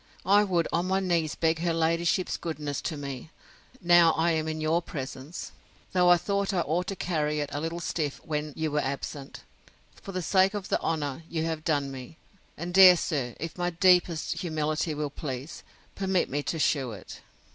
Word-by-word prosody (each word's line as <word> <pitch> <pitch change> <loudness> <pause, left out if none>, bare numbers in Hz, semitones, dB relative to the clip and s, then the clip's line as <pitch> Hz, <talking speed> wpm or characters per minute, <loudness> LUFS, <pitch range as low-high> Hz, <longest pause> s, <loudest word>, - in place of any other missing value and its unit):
I 200 +3 +5
would 175 -5 +1
on 175 +2 +1
my 190 +1 +2
knees 170 -5 0
beg 160 -1 +1
her 170 -1 0
ladyship's 165 +3 +1
goodness 150 -3 -4
to 160 - -4
me, 140 0 -6 0.5
now 175 -2 +6
I 165 +1 +2
am 160 -1 -1
in 155 0 -3
your 155 +2 +1
presence; 140 +1 -7 0.4
though 180 -1 +4
I 175 - +7
thought 200 +1 -1
I 175 - +2
ought 170 +4 -1
to 195 - -3
carry 150 -4 -1
it 145 -1 -3
a 145 - -2
little 165 +2 -3
stiff 155 -4 -3
when 150 -1 -3
you 160 -1 -2
were 150 - +1
absent, 140 0 -5 0.6
for 195 - -8
the 185 -1 -3
sake 190 +3 +3
of 200 -2 -5
the - - +1
honour 145 -3 -2
you 160 -1 -2
have 160 -1 -3
done 145 -4 0
me. 135 +4 -9 0.4
And, 175 +1 -5
dear 185 -1 +9
sir, 130 -7 -2
if 165 +3 -6
my 175 0 +1
deepest 175 -2 +2
humility 155 -1 -1
will 150 -1 -3
please, 135 0 -6 0.3
permit 190 -5 0
me 145 +2 0
to 165 - -3
shew 135 -6 +1
it. 95 - -10
160 Hz, 190 wpm, -27 LUFS, 150-175 Hz, 0.6 s, dear